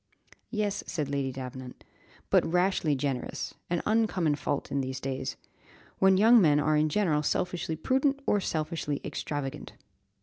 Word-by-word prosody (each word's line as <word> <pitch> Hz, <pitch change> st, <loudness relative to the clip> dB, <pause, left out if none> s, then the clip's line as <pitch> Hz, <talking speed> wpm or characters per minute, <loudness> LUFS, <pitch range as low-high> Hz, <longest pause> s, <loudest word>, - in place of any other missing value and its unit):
"Yes," 210 Hz, -2 st, -1 dB
said 150 Hz, -6 st, -2 dB
Lady 140 Hz, -2 st, -1 dB
Davenant, 130 Hz, -1 st, -8 dB, 0.5 s
"but -, -, +5 dB
rashly 180 Hz, -3 st, +1 dB
generous; 135 Hz, -2 st, -3 dB, 0.2 s
an 175 Hz, -1 st, -1 dB
uncommon 210 Hz, -8 st, +2 dB
fault 145 Hz, -1 st, -3 dB
in 140 Hz, -, 0 dB
these 130 Hz, 0 st, -4 dB
days, 130 Hz, 0 st, -4 dB, 0.6 s
when 190 Hz, 0 st, +5 dB
young 225 Hz, +3 st, +7 dB
men 150 Hz, -4 st, +4 dB
are 155 Hz, +1 st, +2 dB
in 155 Hz, +1 st, +3 dB
general 160 Hz, -5 st, +1 dB
selfishly 170 Hz, +1 st, -1 dB
prudent 265 Hz, -, +1 dB
or 205 Hz, -, +3 dB
selfishly 155 Hz, -3 st, -2 dB
extravagant." 145 Hz, -3 st, -4 dB
155 Hz, 140 wpm, -28 LUFS, 140-190 Hz, 0.6 s, young